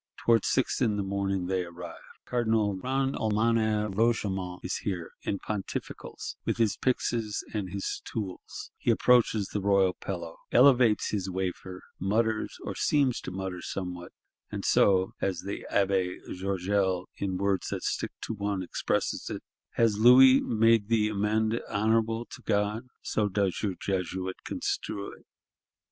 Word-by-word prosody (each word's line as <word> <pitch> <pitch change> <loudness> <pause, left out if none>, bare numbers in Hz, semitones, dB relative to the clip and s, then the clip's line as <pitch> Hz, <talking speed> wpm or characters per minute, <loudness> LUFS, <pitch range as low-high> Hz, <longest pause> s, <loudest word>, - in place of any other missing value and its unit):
Towards 115 -3 +4
six 130 - +1
in 110 -5 +2
the 100 - 0
morning, 95 -1 -1
they 95 0 0
arrive. 85 0 -9 0.2
Cardinal 110 -4 +1
Grand 135 +7 -1
Almoner 110 0 +1
Roche 115 +3 +1
Aymon 95 -2 -3
is 90 - -2
here, 90 -5 -4
in 100 - -2
pontificals, 100 -1 -5
with - - -1
his 115 -3 +2
pyxes 115 -4 -1
and 100 -4 -2
his 100 +1 -3
tools; 100 -5 -6
he - - -1
approaches 115 -4 +4
the 105 - -2
royal 100 -2 +3
pillow; 85 -4 -6
elevates 125 -4 +5
his 95 -3 -2
wafer; 95 0 -4 0.2
mutters 110 +3 0
or - - -4
seems 140 -4 +1
to - - -6
mutter 95 -1 -5
somewhat;—and 90 -2 -7
so 95 -1 +4
(as 95 -3 -1
the 100 - -6
Abbé 95 -2 +1 0.2
Georgel, 95 0 0
in 95 -2 -2
words 100 0 0
that - - -4
stick - - -1
to - - -3
one, 100 -2 -2
expresses 90 - -2
it) - - -5 0.3
has 110 -3 +2
Louis 130 +3 +8
"made 115 -2 +3
the 110 -2 +2
amende 110 +2 0
honorable 115 +2 +1
to - - -11
God;" 105 +3 0 0.2
so 105 -1 0
does 95 -2 0
your 100 -4 -1
Jesuit 95 -1 -2
construe 100 -1 -3
it. - - -17
100 Hz, 145 wpm, -28 LUFS, 95-115 Hz, 0.3 s, Louis